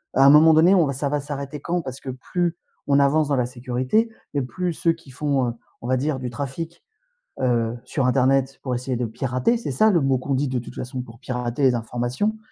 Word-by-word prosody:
à 135 - +6
un 140 - +9
moment 160 +2 +7
donné, 170 +5 +6
on 175 -5 +5
va 140 - -2
ça 140 +2 -2
va 145 0 0
s'arrêter 140 0 -5
quand? 175 +2 -1
Parce 130 -2 -7
que 135 - -8
plus 170 +6 -2 0.3
on 140 0 +4
avance 145 +2 +3
dans 140 - +1
la 125 -2 +1
sécurité 125 - 0 0.2
et 145 - +1
plus 175 +7 -3
ceux 165 +1 +1
qui 165 -5 -16
font, 135 -1 0
heu, - - -4 0.3
on 120 - -6
va 130 - +2
dire 140 +1 -1
du 125 -1 -4
trafic, 145 +6 -6 0.6
heu, 120 -2 +1
sur 135 -4 -1
internet 135 +1 +2
pour 130 -2 -1
essayer 125 +1 -2
de 120 0 -1
pirater, 130 - 0
c'est 185 - -4
ça 215 +12 +4
le 170 - +4
mot 135 -2 +2
qu'on 135 +2 -2
dit 140 +2 0
de 130 -1 -1
toute 120 - -10
façon 125 0 -5
pour 115 -1 -12
pirater 125 +1 -3
les 130 -2 +5
informations, 125 - -2
135 Hz, 235 wpm, -23 LUFS, 125-150 Hz, 0.6 s, un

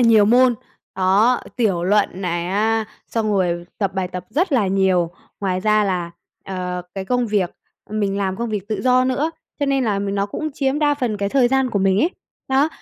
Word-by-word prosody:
nhiều 225 -3 +6
môn, 245 +3 +5 0.4
đó, 195 +6 +3 0.2
tiểu 195 -8 +1
luận 205 +2 +3
này 175 -1 -1
á, 220 +3 +1 0.2
xong 220 -2 -1
rồi 175 -3 0
tập 195 -3 0
bài 190 -2 -1
tập 180 0 -6
rất 345 +4 0
là 235 -7 +3
nhiều. 190 -3 +2 0.3
Ngoài 185 -2 -1
ra 215 +1 +3
là, 180 -3 -1 0.3
ờ, 180 -1 -4
cái 195 -1 -4
công 245 +3 0
việc, 200 -5 0 0.4
ờm, 215 - -2
mình 200 -1 0
làm 190 -1 -1
công 235 +2 -3
việc 210 -2 -4
tự 215 - -2
do 255 0 +4
nữa, 265 +5 0 0.3
cho 285 - +1
nên 275 -2 +1
là 205 -3 0
m 200 0 -2
nó 200 0 0
cũng 310 +9 -4
chiếm 275 +1 0
đa 295 -1 +3
phần 245 -6 -2
cái 200 0 -1
thời 255 +1 +3
gian 265 0 +1
của 205 - 0
mình 190 0 +2
ấy. 330 - +2 0.4
Đó. 270 +3 +3
210 Hz, 215 wpm, -21 LUFS, 190-250 Hz, 0.4 s, nhiều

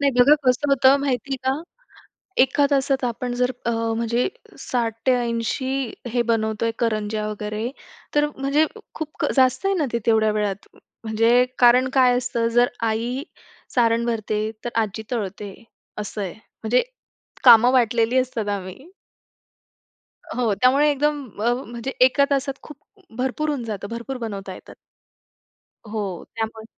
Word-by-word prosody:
नाही 280 -1 +3
बघा 275 +5 +7
कसं 255 +4 +2
होतं 270 0 +5
माहिती 270 -1 -1
आहे - - -4
का. 280 +5 0 0.8
एका 270 +2 +3
तासात 270 -1 +1
आपण 245 +1 -3
जर 250 +1 +1
अ, 235 - +1
म्हणजे 230 +1 0 0.3
60 235 -3 -1
ते 260 - +6
80 240 +2 -2 0.2
हे 245 - +2
बनवतोय 220 0 0
करंज्या 215 -2 -1
वगैरे, 210 +2 -4 0.5
तर 295 0 +4
म्हणजे 275 +3 +2 0.3
खूप 310 -1 -4
जास्त 260 +6 +3
आहे 390 - +3
ना 305 - +1
ते 235 - +1
तेवढ्या 220 -1 +3
वेळात. 205 -2 -2 0.4
म्हणजे 230 +3 +3
कारण 250 +1 +5
काय 250 -2 +4
असतं 240 -2 -1
जर 245 0 +5 0.2
आई 240 +5 -2 0.5
सारण 230 -1 +3
भरते, 215 -2 -1
तर - - -1
आजी 220 0 -4
तळतंय 205 -3 -4 0.4
असं 210 0 -5
आहे. 185 -3 -4
म्हणजे 225 - -1 0.6
कामं 240 0 +8
वाटलेली 235 -1 +2
असतात 240 -5 -2
आम्ही. 200 - -6 1.5
हो, 235 -4 +1
त्यामुळे 270 +7 +4
एकदम 295 0 0 0.2
अ, 240 - +4
म्हणजे 235 +3 -6
एका 260 +2 +5
तासात 275 0 0
खूप 300 - -11 0.4
भरपूर 265 +4 -1
होऊन 280 -5 -2
जातं. 205 -3 -5
भरपूर 235 +3 -5
बनवता 200 -5 -6
येतात. - - -13 1.2
हो, 200 -5 -4
त्यामुळे 220 0 -4
240 Hz, 140 wpm, -22 LUFS, 220-265 Hz, 1.5 s, कामं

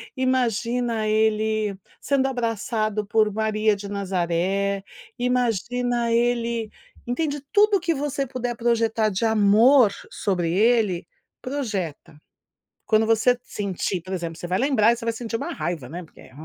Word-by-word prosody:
imagina 240 -3 0
ele 215 -1 +1 0.2
sendo 270 -1 +1
abraçado 225 -3 -1
por 215 +1 +2
Maria 215 0 +1
de 200 0 -8
Nazaré, 195 0 -1 0.4
imagina 245 0 0
ele 235 -1 0 0.4
entende 290 +3 -2
tudo 415 -1 +5
o - - -5
que 340 -1 0
você 275 -1 -2
puder 245 -1 -3
projetar 230 -2 +1
de 190 +1 -3
amor 220 +3 +5 0.2
sobre 180 -4 -1
ele, 210 -5 +2 0.3
projeta. 210 - -4 0.7
Quando 220 0 +3
você 225 +3 +3
sentir 195 -2 -3
por 185 +3 -10
exemplo 170 -3 -4
você 175 - -5
vai 180 +1 0
lembrar 235 -3 +3
você 235 - -10
vai 230 - 0
sentir 230 0 -5
uma 275 - -4
raiva, 155 -4 -4
né, 175 +3 -6
porque 160 - -18
é, - - -16
220 Hz, 140 wpm, -24 LUFS, 200-245 Hz, 0.7 s, tudo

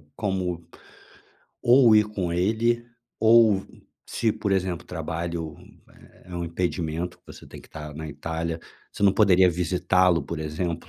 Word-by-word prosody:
como 90 -5 -3 1.0
ou 120 -2 +6
ir 105 0 +6
com 95 -5 -3
ele 115 +6 +1 0.4
ou, 110 -3 +5 0.4
se, 110 -2 -1
por 100 - -3
exemplo, 90 -2 -1
trabalho 85 -1 -4 0.4
é - - -20 0.2
é 85 - -4
um 85 - -3
impedimento 85 0 -3
que - - -44
você - - -12
tem - - -11
que - - -18
tá 75 0 -8
na 80 +1 -6
Itália, 80 +3 -4 0.3
você - - -7
não 100 - +5
poderia 95 -3 +5
visitá-lo, 90 0 +2
por 85 +3 -6
exemplo, 80 +2 -4
90 Hz, 150 wpm, -25 LUFS, 85-100 Hz, 1.0 s, ou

